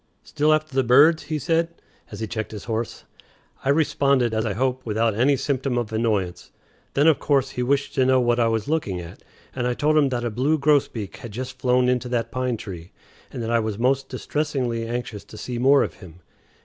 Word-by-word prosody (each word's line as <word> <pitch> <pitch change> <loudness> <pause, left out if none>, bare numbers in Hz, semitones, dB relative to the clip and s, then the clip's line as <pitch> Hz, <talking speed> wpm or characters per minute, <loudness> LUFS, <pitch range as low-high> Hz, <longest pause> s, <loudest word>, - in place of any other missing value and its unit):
"Still 150 +1 +1
after 155 -1 +1
the 135 0 +2
birds?" 145 +7 +5
he 155 - -2
said, 165 +2 +1 0.4
as - - -8
he - - -1
checked 110 0 -5
his 105 - -7
horse. 115 -1 -4 0.6
I 135 - -1
responded, 140 -5 +2
as 110 +1 0
I 105 - -1
hope, 130 +4 -1
without 110 0 0
any 130 +7 +3
symptom 130 -2 -1
of 115 -2 -2
annoyance. 105 -6 -1 0.5
Then, 145 - +3
of 160 -3 +5
course, 135 -2 +1
he 125 - -4
wished 140 +3 0
to 130 - +2
know 130 0 +4
what 120 -1 +2
I 115 - +3
was 115 -2 -1
looking 145 - -1
at, 85 -1 -10 0.3
and 125 -1 -1
I 125 - 0
told 155 +3 +2
him 140 -2 +3
that 120 -2 -2
a 120 - -1
blue 135 +8 +1
grosbeak 140 -8 +1
had 120 - -9
just 130 +3 -6
flown 125 0 +2
into 125 0 0
that 120 -2 -1
pine 130 -2 -1
tree, 90 -5 -9 0.4
and 120 - -5
that 115 - -2
I 120 - +3
was 110 -2 -3
most 135 +3 +1
distressingly 130 -7 -2
anxious 120 -3 -4
to 110 - -12
see 120 +3 -5
more 135 +3 +5
of - - -4
him. 90 -2 -14
125 Hz, 215 wpm, -23 LUFS, 115-140 Hz, 0.6 s, birds